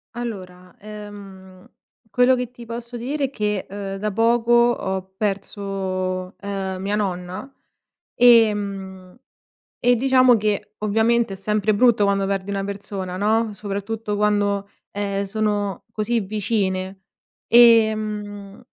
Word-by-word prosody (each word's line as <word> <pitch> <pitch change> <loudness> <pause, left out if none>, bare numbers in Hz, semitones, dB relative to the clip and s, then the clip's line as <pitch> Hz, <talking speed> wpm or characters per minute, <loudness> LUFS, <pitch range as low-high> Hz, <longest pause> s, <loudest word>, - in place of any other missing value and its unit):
Allora, 185 -6 -7
ehm, 200 -3 -11 0.4
quello 250 +4 +4
che 250 -1 -4
ti 240 -1 -12
posso 235 +1 -7
dire 275 +3 -2
che, 210 -6 -2
uhm, 195 0 -5
da 210 +2 -2
poco 230 +3 +2
ho 190 -6 +1
perso, 190 -2 -3
uhm, 195 -2 -4
mia 200 +2 -1
nonna, 185 +3 -4 0.7
ehm, 200 -6 +3 0.7
e 245 0 +4
diciamo, 255 0 +5
che 210 -1 -2
ovviamente 225 +1 +2
è - - -5
sempre 210 +2 0
brutto 225 -1 +4
quando 200 -1 +1
perdi 195 0 -2
una 195 -1 -2
persona, 195 -2 -5
no, 215 +2 +1
soprattutto 205 +2 -4
quando, 205 -1 +1 0.2
ehm, 200 -1 -2
sono 205 -2 -2
così 225 +2 -1
vicine. 195 -2 -2 0.5
Ehm, 215 -3 +3
205 Hz, 115 wpm, -22 LUFS, 195-225 Hz, 0.7 s, diciamo